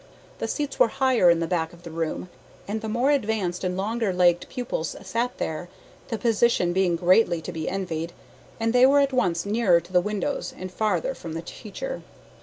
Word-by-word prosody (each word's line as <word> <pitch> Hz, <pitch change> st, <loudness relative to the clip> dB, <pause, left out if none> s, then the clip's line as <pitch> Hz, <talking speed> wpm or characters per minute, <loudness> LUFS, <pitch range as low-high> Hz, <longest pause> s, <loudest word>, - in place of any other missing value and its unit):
The -, -, -2 dB
seats 290 Hz, -2 st, -3 dB
were -, -, +7 dB
higher 255 Hz, -6 st, +3 dB
in 170 Hz, -1 st, +4 dB
the -, -, +1 dB
back 165 Hz, -1 st, -1 dB
of 175 Hz, 0 st, -16 dB
the 170 Hz, -, -8 dB
room, 165 Hz, +2 st, -3 dB, 0.4 s
and 215 Hz, +2 st, -3 dB
the 220 Hz, -, -4 dB
more 245 Hz, +6 st, +2 dB
advanced 210 Hz, -9 st, 0 dB
and 180 Hz, 0 st, -1 dB
longer 220 Hz, +1 st, 0 dB
legged 175 Hz, -1 st, +3 dB
pupils 240 Hz, -, -3 dB
sat 230 Hz, +6 st, -2 dB
there, 160 Hz, +3 st, -4 dB, 0.4 s
the 225 Hz, -, -2 dB
position 225 Hz, -5 st, +2 dB
being 185 Hz, -2 st, +2 dB
greatly 180 Hz, +1 st, +4 dB
to 160 Hz, -, -6 dB
be 160 Hz, -2 st, -3 dB
envied, 170 Hz, -4 st, -3 dB, 0.5 s
as 225 Hz, 0 st, +1 dB
they 250 Hz, +2 st, +6 dB
were 285 Hz, +1 st, +5 dB
at 280 Hz, -1 st, +2 dB
once 175 Hz, -8 st, +1 dB
nearer 200 Hz, -4 st, +3 dB
to 175 Hz, +2 st, -15 dB
the 180 Hz, -, +5 dB
windows 210 Hz, +9 st, -3 dB
and 185 Hz, 0 st, -6 dB
farther 210 Hz, +3 st, 0 dB
from 165 Hz, -10 st, -8 dB
the 165 Hz, +1 st, -4 dB
teacher. -, -, -6 dB
190 Hz, 200 wpm, -25 LUFS, 175-235 Hz, 0.5 s, were